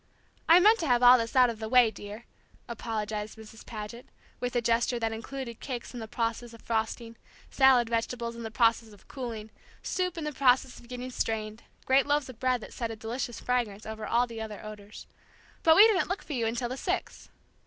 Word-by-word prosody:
"I 335 +2 +9
meant 430 +5 +5
to 325 - -2
have 245 -1 +3
all 245 0 +10
of 255 - +5
this 230 +2 -5
out 250 -2 +6
of 220 - -10
the 220 -1 -5
way, 245 -2 +5
dear," 210 +3 -9 0.4
apologized 215 -2 -4
Mrs. 220 0 -12
Paget, 225 +2 -8 0.3
with 245 0 -3
a - - +4
gesture 235 +1 +1
that 225 -1 -1
included 235 +1 -7
cakes 250 -3 -6
in 245 - -6
the 220 - -6
process 230 +1 -3
of 230 - -17
frosting, 230 +1 -3 0.3
salad 265 -3 +5
vegetables 235 0 -2
in 235 - -8
the 225 - -5
process 225 -1 +1
of 205 - -19
cooling, 225 -5 -6 0.3
soup 365 -1 -2
in 325 - -4
the 300 - -2
process 260 -1 +2
of 235 - -16
getting 250 +1 -6
strained, 220 -2 -3 0.2
great 265 +1 +3
loaves 290 -2 +1
of 245 -3 -11
bread 255 -2 +1
that - - -10
sent 230 -2 -3
a - - -5
delicious 230 +2 -5
fragrance 230 -5 -2
over 220 0 -6
all 240 +1 +3
the 230 -2 -8
other 215 -1 -7
odors. 210 -1 -10 0.6
"But 320 -1 +6
we 410 - +9
didn't 405 -6 +1
look 380 +2 -3
for 300 - -6
you 235 -4 0
until 240 +2 -2
six." 365 +7 -4
235 Hz, 210 wpm, -28 LUFS, 225-255 Hz, 0.6 s, all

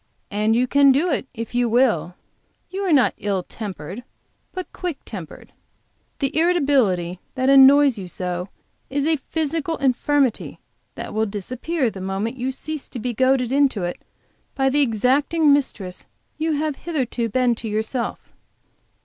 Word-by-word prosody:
And 215 +2 +1
you 245 +2 +3
can 280 +1 +5
do 310 +7 +2
it 270 -1 -1
if 230 0 -6
you 245 -1 +1
will. 220 -9 +2 0.6
You 385 +1 -3
are - - +1
not 275 -5 +4
ill 195 -3 -1
tempered 195 0 -7 0.5
but 370 -1 -7
quick 350 -5 -4
tempered; 185 -8 -9 0.6
the 275 0 -2
irritability 270 - +2 0.2
which 260 0 +1
annoys 275 -2 +7
you 185 - -6
so 180 +1 -4 0.4
is 280 +1 -1
a 320 0 +2
physical 320 +2 -2
infirmity 270 -1 +1 0.4
which - - -5
will 220 +1 0
disappear 245 - -2
the 190 - -8
moment 195 +5 -2
you 255 0 -2
cease 295 +2 -6
to - - -7
be 245 +1 -3
goaded 260 +1 +2
into 270 -8 +2
it 175 0 -4 0.5
by 270 -1 +2
that 275 - 0
exacting 280 +5 +3
mistress 200 -10 -2 0.3
you 320 0 0
have 300 -1 -1
hitherto 255 -8 -2
been 250 +1 +2
to 230 0 -5
yourself." 220 +3 -3
255 Hz, 150 wpm, -22 LUFS, 215-285 Hz, 0.6 s, annoys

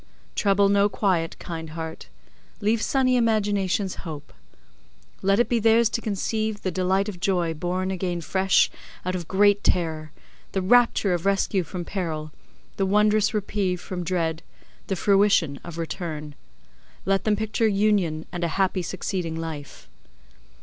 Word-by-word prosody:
Trouble 200 -1 +3
no 200 +1 +3
quiet, 185 -5 0
kind 165 -2 -6
heart; 160 0 -6 0.5
leave 220 +2 +1
sunny 255 0 +2
imaginations 205 -4 +1
hope. 150 - -8 0.9
Let 195 +2 +3
it 240 - +3
be 240 - +1
theirs 225 +1 +4
to 230 - -2
conceive 215 0 -2
the 185 - -1
delight 190 +2 +1
of 195 -4 -6
joy 175 -3 +1
born 180 +4 -2
again 180 -2 -2
fresh 190 +3 +2 0.3
out 185 - -1
of 175 -3 -4
great 205 +1 +3
terror, 160 -3 0 0.4
the 190 - 0
rapture 230 -2 +4
of 175 +2 -1
rescue 195 0 +2
from 175 +1 -6
peril, 160 -6 -4 0.5
the 195 - +1
wondrous 210 +1 +3
reprieve 200 -3 -1
from 180 0 -5
dread, 165 -2 -1 0.5
the 195 - -1
fruition 195 -7 +3
of 170 -1 -8
return. 160 -3 -5 0.7
Let 195 0 +1
them 215 -1 +2
picture 220 +1 0
union 195 -6 +1
and 175 0 -4
a - - +2
happy 190 -1 +1
succeeding 175 -1 -3
life. 155 - -7
190 Hz, 145 wpm, -25 LUFS, 170-205 Hz, 0.9 s, theirs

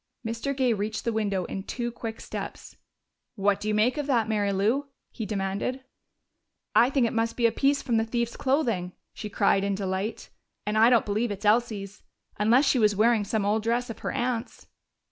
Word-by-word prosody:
Mr. 230 +5 -3
Gay 255 -3 +3
reached 215 +1 -3
the 235 - 0
window 200 -4 0
in 195 - -5
two 240 +4 -4
quick 225 -1 -6
steps. - - -7 0.6
"What 200 -1 +2
do 210 - -5
you 215 - +1
make 240 +7 +2
of 290 - -3
that, 235 -6 +2
Mary 205 -2 +1
Lou?" 220 +9 +1 0.2
he 220 - -5
demanded. 200 +6 -2 0.9
"I 240 - +6
think 270 -3 +2
it 230 - -1
must 230 0 -1
be 240 - +2
a 230 - +5
piece 280 +3 +1
from 240 -4 +1
the 225 - +2
thief's 235 +1 -2
clothing!" 235 - 0 0.2
she 210 - -6
cried 195 -1 +2
in 200 0 0
delight. 195 +2 -3 0.4
"And 210 - -1
I 225 +2 +6
don't 240 -3 +4
believe 215 +3 0
it's 205 +1 -5
Elsie's. 210 -2 +1 0.4
Unless 235 +7 +4
she 270 - +3
was 210 -2 +3
wearing 220 +1 +3
some 205 0 -1
old 210 +2 +1
dress 235 +2 -1
of - - -10
her - - -3
aunt's." 240 -1 -3
225 Hz, 200 wpm, -27 LUFS, 205-240 Hz, 0.9 s, I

